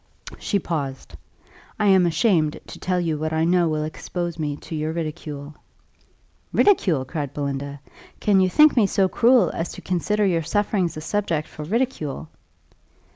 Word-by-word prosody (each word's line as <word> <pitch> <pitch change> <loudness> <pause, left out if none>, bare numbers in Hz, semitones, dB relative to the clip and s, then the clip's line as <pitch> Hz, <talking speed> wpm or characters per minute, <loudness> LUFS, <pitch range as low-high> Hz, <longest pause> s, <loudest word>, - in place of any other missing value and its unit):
She 205 - 0
paused 145 -8 -4 0.7
"I 210 - +2
am 190 -3 +5
ashamed 165 -4 +2
to - - -11
tell 180 -1 0
you 160 -3 -1
what 155 +1 -2
I 160 0 +1
know 175 0 +3
will 155 -1 -1
expose 170 +2 -4
me 150 -2 -2
to - - -10
your 155 0 -2
ridicule." 150 -3 -5 1.0
"Ridicule!" 175 - +3
cried 145 0 -5
Belinda: 140 0 -4 0.4
"can 200 -2 +3
you 185 -1 +3
think 300 +9 +6
me 225 -5 +4
so 195 0 +2
cruel 235 0 +4
as 165 - -3
to - - -9
consider 205 +4 0
your 170 -4 +2
sufferings 190 -1 0
a - - -5
subject 165 -3 -1
for 150 - -8
ridicule?" 165 - -2
165 Hz, 160 wpm, -23 LUFS, 150-195 Hz, 1.0 s, think